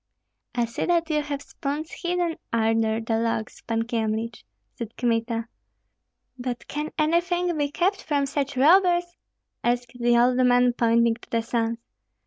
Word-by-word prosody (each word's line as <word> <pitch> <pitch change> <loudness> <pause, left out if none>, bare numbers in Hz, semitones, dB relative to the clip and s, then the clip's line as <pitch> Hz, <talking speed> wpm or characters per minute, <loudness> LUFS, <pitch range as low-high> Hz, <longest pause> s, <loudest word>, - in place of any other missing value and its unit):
"I 240 -1 +2
see 230 - -3
that 335 -2 +1
you 300 -1 +2
have 285 -1 -4
spoons 295 +4 -4
hidden 350 -2 -1 0.2
under 225 -1 +2
the 225 0 0
logs, 225 -1 -2
Pan 225 0 -1
Kyemlich," 225 0 -2 0.3
said 230 -1 -7
Kmita. 230 -1 0 0.9
"But 245 -1 -4
can 300 +1 -3
anything 345 +2 +1
be 290 -2 0
kept 380 +6 0
from 285 -2 0
such 280 0 -2
robbers!" 350 +4 +4 0.5
asked 240 0 0
the 240 0 +4
old 245 +1 +4
man, 245 -1 +4
pointing 235 -1 +3
to - - -17
the 230 -1 0
sons. 230 0 -1
245 Hz, 145 wpm, -25 LUFS, 230-310 Hz, 0.9 s, robbers